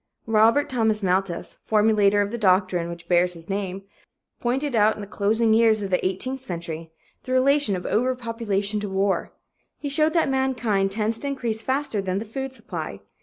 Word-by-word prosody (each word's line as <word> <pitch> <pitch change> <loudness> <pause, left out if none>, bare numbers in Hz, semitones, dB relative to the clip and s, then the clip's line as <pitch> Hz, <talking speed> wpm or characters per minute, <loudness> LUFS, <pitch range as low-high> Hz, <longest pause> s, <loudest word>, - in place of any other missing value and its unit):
Robert 225 +6 +4
Thomas 220 -5 0
Malthus, 185 -1 -1
formulator 210 -2 +3
of 200 - -5
the 235 - -3
doctrine 185 -3 +2
which 170 0 -9
bears 180 0 +3
his 165 +3 -8
name, 195 -1 -3 0.6
pointed 260 +2 -1
out, 215 0 +4
in - - -8
the - - -5
closing 220 +2 +2
years 220 -2 +4
of 195 - -4
the 180 - +1
eighteenth 255 +8 -2
century, 165 -6 -6 0.3
the 255 - -8
relation 265 -3 +3
of 180 - -6
overpopulation 230 -4 -1
to 205 -1 -4
war. 195 +1 0 0.5
He 285 - -5
showed 305 +3 +2
that 330 -3 +2
mankind 250 -7 0
tends 220 +2 +2
to 285 - -5
increase 235 -5 -2
faster 265 -4 -1
than 185 -1 -2
the 215 - -3
food 265 +5 -5
supply. 260 - -7
215 Hz, 175 wpm, -24 LUFS, 195-250 Hz, 0.6 s, Robert